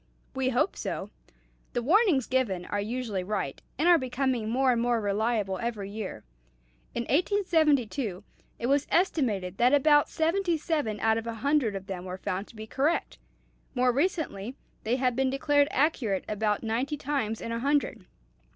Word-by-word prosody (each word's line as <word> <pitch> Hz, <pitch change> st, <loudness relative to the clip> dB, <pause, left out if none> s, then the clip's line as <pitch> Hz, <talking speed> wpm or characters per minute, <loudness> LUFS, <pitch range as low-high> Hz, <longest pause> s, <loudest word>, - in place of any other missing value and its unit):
"We 265 Hz, -1 st, 0 dB
hope 260 Hz, +9 st, +1 dB
so. -, -, -4 dB, 0.6 s
The 240 Hz, -, -1 dB
warnings 335 Hz, -, +4 dB
given 210 Hz, -9 st, 0 dB
are 205 Hz, +2 st, -2 dB
usually 220 Hz, -3 st, -3 dB
right, 190 Hz, -8 st, -3 dB, 0.2 s
and 310 Hz, +6 st, +2 dB
are 345 Hz, -2 st, +7 dB
becoming 255 Hz, -3 st, -1 dB
more 260 Hz, +2 st, +3 dB
and 235 Hz, -1 st, +1 dB
more 240 Hz, -1 st, +2 dB
reliable 205 Hz, -1 st, 0 dB
every 215 Hz, -4 st, -4 dB
year. 205 Hz, -, -6 dB, 0.7 s
In 235 Hz, -, -1 dB
1872 290 Hz, -, +1 dB, 0.3 s
it -, -, -4 dB
was 280 Hz, +2 st, +2 dB
estimated 220 Hz, -, 0 dB
that 250 Hz, +4 st, +5 dB
about 295 Hz, +1 st, +4 dB
seventy 340 Hz, +2 st, +1 dB
seven 290 Hz, -10 st, -1 dB
out 225 Hz, 0 st, +3 dB
of 225 Hz, -, -8 dB
a 230 Hz, -, -3 dB
hundred 280 Hz, -8 st, +2 dB
of 195 Hz, -1 st, -5 dB
them 190 Hz, -2 st, -6 dB
were 185 Hz, 0 st, -5 dB
found 195 Hz, +1 st, -3 dB
to -, -, -16 dB
be 215 Hz, 0 st, -7 dB
correct; 280 Hz, +9 st, -1 dB, 0.6 s
more 250 Hz, 0 st, +3 dB
recently 270 Hz, -, -1 dB, 0.3 s
they 230 Hz, +3 st, +2 dB
have 255 Hz, -2 st, +1 dB
been 265 Hz, +1 st, +1 dB
declared 285 Hz, +1 st, +2 dB
accurate 255 Hz, -, 0 dB
about 210 Hz, 0 st, -1 dB
ninety 245 Hz, +7 st, -1 dB
times 265 Hz, -7 st, -2 dB
in 230 Hz, -, -5 dB
a 230 Hz, -, -2 dB
hundred. 280 Hz, -5 st, 0 dB
245 Hz, 165 wpm, -28 LUFS, 215-285 Hz, 0.7 s, are